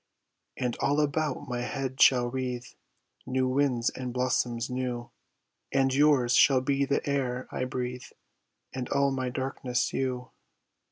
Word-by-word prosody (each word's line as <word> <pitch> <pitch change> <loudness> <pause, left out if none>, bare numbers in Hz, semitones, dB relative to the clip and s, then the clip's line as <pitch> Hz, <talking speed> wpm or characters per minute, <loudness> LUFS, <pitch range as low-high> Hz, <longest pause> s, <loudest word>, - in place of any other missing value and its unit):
And 125 -2 -1
all 140 +2 +2
about 150 -1 -1
my 125 -1 -3
head 130 +1 -3
shall 125 -2 +6
wreathe 125 -1 -3 0.6
New 130 0 +1
winds 130 -3 +1
and 125 -1 -5
blossoms 125 -1 0
new, 125 -2 -4 0.6
And 135 -1 +2
yours 135 -4 +4
shall 130 0 +6
be 140 +1 +1
the 140 +1 -1
air 130 -3 -1
I 130 - -2
breathe 125 0 -4 0.7
And 130 -2 -4
all 140 0 +2
my 130 -1 -2
darkness, 130 -1 -2
you. 125 -1 -2
130 Hz, 135 wpm, -28 LUFS, 125-135 Hz, 0.7 s, shall